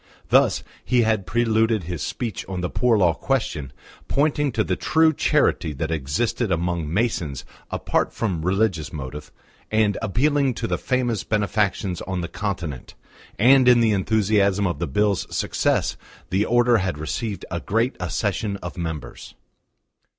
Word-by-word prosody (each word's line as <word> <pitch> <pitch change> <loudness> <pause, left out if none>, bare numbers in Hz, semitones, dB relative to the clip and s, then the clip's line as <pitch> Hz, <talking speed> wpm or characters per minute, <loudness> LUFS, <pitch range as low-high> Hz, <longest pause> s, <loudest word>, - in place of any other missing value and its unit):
Thus - - +4 0.2
he 125 -2 +2
had 110 -4 0
preluded 110 -1 +2
his 85 -2 -5
speech 115 -5 -4
on 95 -1 -3
the 90 - -3
Poor 120 -3 +2
Law 90 -4 +4
question, 85 - -2 0.4
pointing 145 0 +1
to 110 - +1
the - - -1
true 160 0 +3
charity 80 - +1
that 80 +4 -3
existed 80 - -1
among 85 -2 -1
Masons 85 - -1 0.2
apart - - 0
from 95 -8 -2
religious 95 -3 0
motive, 75 0 -7 0.4
and 110 -2 +2
appealing 135 +4 +1
to 115 - -3
the - - -1
famous 125 -5 0
benefactions 100 -3 0
on 95 -2 -3
the 85 - -3
Continent; 85 -10 -5 0.4
and 130 +3 +6
in 125 -1 +7
the 115 -2 +3
enthusiasm 100 -1 +2
of 90 - -2
the 85 - -1
Bill's 100 +7 +1
success - - 0 0.3
the 95 +3 +2
Order 120 0 +4
had 95 -6 -2
received 100 +7 -4
a 85 - -2
great 115 +7 0
accession 100 +3 -2
of 90 -2 -8
members. 80 -3 -6
100 Hz, 150 wpm, -23 LUFS, 85-115 Hz, 0.4 s, in